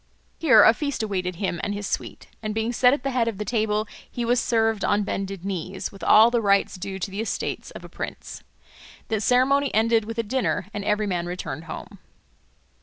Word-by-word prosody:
Here 260 -10 +7
a 225 - +7
feast 285 -4 -3
awaited 185 -4 -2
him 175 -1 -2
and 205 - -1
his 205 0 -5
suite, - - -4 0.2
and 215 -1 -4
being 225 +2 -1
set 250 +1 +5
at 280 -1 -1
the 275 - -1
head 245 -3 +1
of 225 -4 -2
the 210 - -4
table 215 -2 0 0.2
he 240 - -3
was 240 +1 +3
served 225 -4 +1
on 205 0 +2
bended 195 -2 -4
knees, 190 0 -4
with 195 - -12
all 220 +2 +7
the 240 -1 +2
rites 200 -2 +2
due 190 0 -5
to 195 +1 -4
the 200 +3 -3
estate 225 - -4
of - - -9
a - - -8
prince. - - -7 0.7
The 220 -2 0
ceremony 265 +4 +3
ended 225 0 +3
with 225 +1 -5
the 230 - -1
dinner, 205 -8 -1
and 205 - -4
every 210 +1 +1
man 175 -3 -2
returned 165 -4 -5
home. 160 - -8
215 Hz, 210 wpm, -24 LUFS, 195-235 Hz, 0.7 s, Here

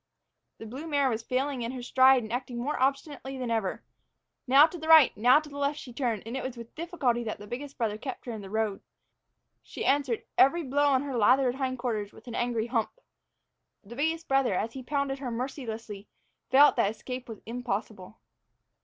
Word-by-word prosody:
The - - -9
blue 265 +9 -7
mare 285 -4 +2
was 225 0 -2
failing 255 +2 -2
in 235 +2 -3
her 250 -2 -6
stride 260 0 +5
and 220 +1 -6
acting 245 -1 -4
more 265 +4 -2
obstinately 270 0 -1
than 250 -2 -3
ever. 220 -5 -1 0.6
Now 275 +4 +8
to 330 +2 -6
the 315 - -6
right, 320 -4 +7
now 250 +7 +5
to 305 - -11
the 285 -1 -8
left, 285 +1 0
she 255 -5 -9
turned, 235 -5 -2
and 230 +3 -5
it 265 - -2
was 255 -1 -5
with 235 -1 -10
difficulty 290 -8 -1
that 220 - -4
the 205 - -11
biggest 270 +6 -7
brother 220 -4 -1
kept 260 +1 -7
her 245 - -4
in 220 -2 -6
the 195 - -9
road. 215 -1 -1 0.8
She - - -7
answered 275 -4 +1 0.2
every 330 +6 +5
blow 285 +1 +1
on 270 -1 +3
her 275 -3 -4
lathered 250 +3 +4
hindquarters 245 -6 -3
with - - -16
an 235 - -7
angry 235 -2 -1
hump. 235 - -2 0.8
The 220 +4 -11
biggest 320 +4 -1
brother, 270 -7 +2
as 225 +5 -2
he 265 - -7
pounded 280 0 -2
her 265 -3 -4
mercilessly, 230 -4 -5 0.4
felt 280 +3 +6
that 200 - +3
escape 250 +3 -7
was 220 - -8
impossible. 220 -4 -5
255 Hz, 200 wpm, -28 LUFS, 230-280 Hz, 0.8 s, Now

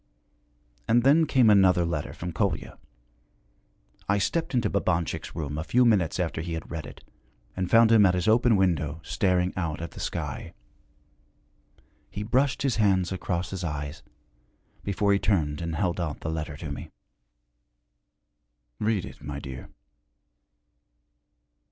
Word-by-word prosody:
And 120 +1 +4
then 155 +4 +5
came 130 -4 +4
another 95 -4 +5
letter 80 -3 -3
from 90 0 -6
Kolya. 80 - -2 1.3
I 100 - +3
stepped 150 - -1
into 120 -3 +2
Babanchik's 90 -4 -1
room 75 -2 -4
a - - -2
few 125 +9 +3
minutes 95 -8 +2
after 85 -3 -1
he 85 0 -5
had 80 - -6
read 80 -4 -5
it - - -13 0.5
and 95 -1 -2
found 115 0 +6
him 110 -2 +7
at 90 - +2
his 90 +3 -1
open 115 +1 +4
window, 80 -6 +1
staring 90 -3 +1
out 85 -5 -2
at 85 -1 -6
the - - -11
sky. - - -5 1.5
He 105 - -5
brushed 130 +6 +1
his 135 -5 +1
hands 95 -5 +2
across 90 -1 -3
his 95 -1 -5
eyes 75 -2 -4 0.8
before 100 +1 +1
he 100 - +2
turned 80 -9 0
and 85 -1 -3
held 90 +1 -1
out 80 -4 -4
the 80 - -3
letter 75 -3 -4
to 75 -2 -6
me. 70 - -7 1.9
'Read 105 -4 0
it, - - -12
my 70 -1 -6
dear.' 65 -3 -8
90 Hz, 145 wpm, -26 LUFS, 80-105 Hz, 1.9 s, him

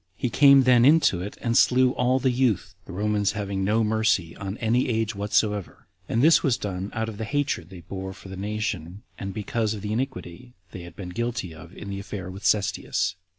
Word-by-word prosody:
He 125 - -2
came 140 +2 +7
then 125 -2 +5
into 140 - +4
it, 100 +3 -7
and 115 -1 0
slew 130 0 +5
all 125 0 +1
the 130 0 +1
youth, 115 -8 0
the - - -10
Romans 105 +1 0
having 100 -2 -3
no 110 +3 +2
mercy 110 -6 +1
on 100 +2 -6
any 120 +3 +1
age 110 -1 0
whatsoever; 105 -1 -1 0.2
and 115 +3 +1
this 160 +2 +6
was 130 -6 +1
done 95 -3 -4
out 110 0 -1
of 110 -1 -7
the - - -2
hatred 135 - -2
they 95 -3 -11
bore 95 +3 -6
the 95 0 -8
nation, 100 -2 -4 0.2
and 95 -1 -4
because 110 +2 -2
of 105 - -8
the 105 0 -2
iniquity 125 -3 -5 0.2
they 90 - -8
had 85 -1 -11
been 95 -3 -7
guilty 115 -3 -3
of 85 +3 -13
in 100 - -7
the 100 - -4
affair 100 -1 -6
of 95 +2 -9
Cestius. 100 -2 0
105 Hz, 205 wpm, -25 LUFS, 95-120 Hz, 0.2 s, came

